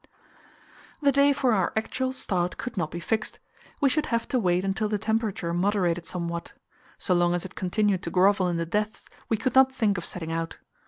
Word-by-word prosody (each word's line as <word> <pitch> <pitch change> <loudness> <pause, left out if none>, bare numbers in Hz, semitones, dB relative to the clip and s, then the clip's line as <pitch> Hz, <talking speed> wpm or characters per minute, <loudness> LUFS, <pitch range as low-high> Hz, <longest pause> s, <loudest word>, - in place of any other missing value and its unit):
The 280 - +5
day 280 +1 +5
for 265 -3 +2
our 190 -4 +1
actual 255 +4 -1
start 180 -8 -1
could 245 - -5
not 175 -6 -1
be 170 - -6
fixed; 220 +4 -2 0.4
we 280 - +4
should 300 +3 +1
have 230 -1 -1
to 255 - +1
wait 180 -2 +1
until 195 +2 0
the 210 - 0
temperature 220 -4 -1
moderated 175 -2 +1
somewhat. 170 -1 -4 0.4
So 185 - 0
long 175 0 +3
as 175 - -3
it 185 - -8
continued 195 0 0
to - - -4
grovel 190 +2 +3
in 175 -1 -1
the 165 - -1
depths, 210 +5 -2 0.2
we 225 - +2
could 255 +4 -1
not 265 0 +6
think 210 -7 +1
of 170 - -7
setting 165 -2 -5
out. 165 0 -3
195 Hz, 205 wpm, -26 LUFS, 175-225 Hz, 0.4 s, not